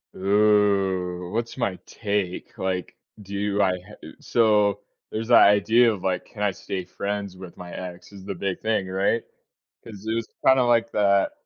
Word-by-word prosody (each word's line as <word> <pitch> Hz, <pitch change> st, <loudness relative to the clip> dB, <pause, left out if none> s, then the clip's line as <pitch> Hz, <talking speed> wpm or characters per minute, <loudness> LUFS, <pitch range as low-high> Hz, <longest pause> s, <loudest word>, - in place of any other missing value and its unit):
Ooh, 95 Hz, -3 st, +2 dB
what's 115 Hz, +2 st, -3 dB
my 110 Hz, -7 st, -1 dB
take? 100 Hz, -4 st, -3 dB
Like, 95 Hz, -1 st, -3 dB, 0.3 s
do 100 Hz, +1 st, -2 dB
I 95 Hz, -2 st, +3 dB
I -, -, -4 dB, 0.4 s
so, 105 Hz, -3 st, +2 dB, 0.3 s
there's 110 Hz, +1 st, -3 dB
the 120 Hz, -, +7 dB
idea 110 Hz, +4 st, +6 dB
of, 100 Hz, -4 st, -5 dB
like, 90 Hz, -1 st, -1 dB
can 105 Hz, -, -11 dB
I 105 Hz, -, +2 dB
stay 95 Hz, -1 st, -5 dB
friends 100 Hz, -1 st, -4 dB
with 95 Hz, -2 st, -11 dB
my 90 Hz, -1 st, -9 dB
ex 90 Hz, +1 st, -8 dB
is 100 Hz, -2 st, -12 dB
the 100 Hz, -1 st, -4 dB
big 95 Hz, +1 st, -3 dB
thing, 110 Hz, -4 st, 0 dB
right? 95 Hz, +5 st, 0 dB, 0.6 s
'Cause 105 Hz, -2 st, -11 dB
it 110 Hz, -, -1 dB
was 115 Hz, 0 st, -2 dB, 0.2 s
kinda 130 Hz, -1 st, +6 dB
like 115 Hz, -1 st, +2 dB
that 100 Hz, -1 st, +3 dB
100 Hz, 170 wpm, -24 LUFS, 95-110 Hz, 0.6 s, the